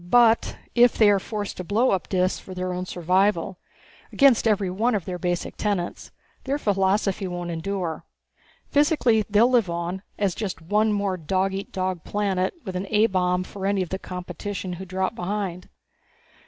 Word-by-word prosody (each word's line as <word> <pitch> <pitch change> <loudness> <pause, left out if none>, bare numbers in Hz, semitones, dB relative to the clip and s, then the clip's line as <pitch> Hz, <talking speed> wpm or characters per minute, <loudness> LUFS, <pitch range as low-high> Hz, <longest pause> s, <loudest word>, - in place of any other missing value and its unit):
But 230 +1 +4 0.2
if 240 0 +5
they 210 -2 +6
are 200 - +3
forced 205 0 -5
to 185 - -4
blow 215 +8 +2
up 190 - -1
Dis 185 -1 +1
for 185 - -10
their 180 0 -2
own 180 0 -4
survival 180 +1 +1 0.5
against 270 -5 +5
every 200 -4 +1
one 220 +5 +1
of 195 - -2
their 180 -1 -4
basic 175 0 -2
tenets 200 -5 -2 0.4
their 275 +2 0
philosophy 195 -3 +1
won't 175 -1 -4
endure. 170 0 -3 0.7
Physically 290 -6 +3
they'll 210 +3 +5
live 235 -7 +3
on, 170 +2 -3 0.2
as 200 -3 +1
just 200 -2 -4
one 210 +6 +1
more 200 -2 0
dog 190 +4 0
eat 195 +1 -5
dog 185 -2 -2
planet 195 - -1
with 190 -2 -5
an 185 +2 -3
A 215 0 +4
bomb 180 -3 +1
for 195 +1 -5
any 200 -1 +1
of 175 - -8
the 190 - -3
competition 180 +1 -5
who 185 +2 -7
drop 190 +2 -2
behind." 185 -2 -4
190 Hz, 175 wpm, -24 LUFS, 180-210 Hz, 0.7 s, they